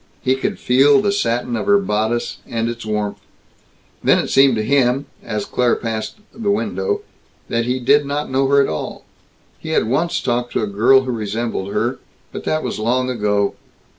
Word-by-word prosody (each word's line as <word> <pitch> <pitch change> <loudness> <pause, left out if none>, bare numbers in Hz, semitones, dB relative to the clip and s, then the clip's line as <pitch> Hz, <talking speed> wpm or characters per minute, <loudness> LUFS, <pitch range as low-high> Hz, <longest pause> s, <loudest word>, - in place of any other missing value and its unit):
He 130 -1 +3
could 135 - -2
feel 135 +5 +4
the 205 0 +1
satin 120 -10 -1
of 115 - -3
her 205 0 +6
bodice 120 - -1
and 115 -1 -2
its 115 -1 -5
warmth. 105 -1 -2 0.8
Then - - +5
it - - -1
seemed 135 -2 +5
to 110 - -1
him, 135 +2 +2 0.2
as 105 -3 -3
Claire 125 -1 +1
again - - -4
passed 110 -2 -3 0.2
the 220 -3 -3
window, 415 - -1 0.5
that 115 0 0
he 125 +1 -1
did 140 +3 +3
not 145 +1 -2
know 135 +1 +2
her 140 +1 +4
at 140 - +3
all. 75 - -5 0.5
He 160 - -8
had - - +2
once 155 +8 0
talked 120 0 -2
to - - 0
a - - +2
girl 110 +6 +4
who 130 -1 -3
resembled 110 -2 -3
her, - - -1 0.3
but - - -7
that 155 0 0
was - - -3
long 125 +3 0
ago. 105 -3 0
125 Hz, 195 wpm, -19 LUFS, 110-140 Hz, 0.8 s, her